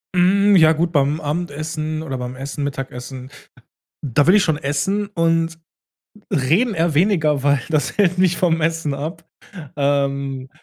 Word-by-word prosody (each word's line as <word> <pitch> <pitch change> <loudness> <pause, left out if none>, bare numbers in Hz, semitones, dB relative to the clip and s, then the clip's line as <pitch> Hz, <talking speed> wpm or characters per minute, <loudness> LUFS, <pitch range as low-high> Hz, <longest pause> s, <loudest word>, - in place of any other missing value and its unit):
Hm, 200 +3 +4
ja 160 -2 +6
gut, 170 +2 -1
beim 145 0 +1
Abendessen 155 0 -4
oder 135 -5 -5
beim 125 +1 -5
Essen, 140 +2 -5
Mittagessen, 130 -1 -6 0.7
da 145 +2 +1
will 190 - +6
ich 205 - +4
schon 155 -3 +1
essen 150 +9 -1
und 165 -3 0 0.7
reden 175 - +1
eher 165 -3 0
weniger, 160 -6 +2
weil 140 -2 +2
das 155 -2 0
hält 185 -3 +2
mich 180 -1 +2
vom 165 -2 +1
Essen 160 -3 -1
ab, 155 +5 -6 0.5
ähm, 140 -2 -1
155 Hz, 145 wpm, -20 LUFS, 140-170 Hz, 0.7 s, ja